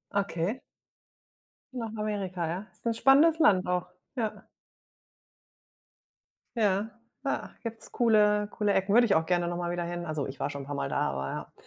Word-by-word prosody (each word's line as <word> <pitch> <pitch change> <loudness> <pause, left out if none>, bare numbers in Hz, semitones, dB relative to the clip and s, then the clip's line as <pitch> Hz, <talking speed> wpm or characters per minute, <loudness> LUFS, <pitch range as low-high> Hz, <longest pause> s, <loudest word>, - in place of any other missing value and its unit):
Okay. 200 +3 -1 1.1
Nach 235 -3 -4
Amerika, 195 -5 -2
ja? 180 +5 -4
Ist - - -17
'n 230 - +2
spannendes 290 +7 +5
Land 190 - +4
auch, 180 0 0 0.3
ja. 225 -4 -3 2.1
Ja, 205 -1 +2 0.3
ja, 275 - -2
gibt's 230 -1 -7
coole 210 -3 +3
coole 205 -1 +1
Ecken. 190 +1 +1
Würde 240 +2 +7
ich 205 - +3
auch 160 - +2
gerne 175 0 +1
noch 175 0 -2
mal 175 0 -2
wieder 175 0 -2
hin. 175 0 -4
Also, 155 -3 -2
ich 135 - -8
war - - -1
schon 140 -1 -6
'n - - -10
paar 145 +1 -5
Mal 140 -1 -2
da, - - 0
aber 70 0 -5
195 Hz, 170 wpm, -29 LUFS, 175-220 Hz, 2.1 s, Würde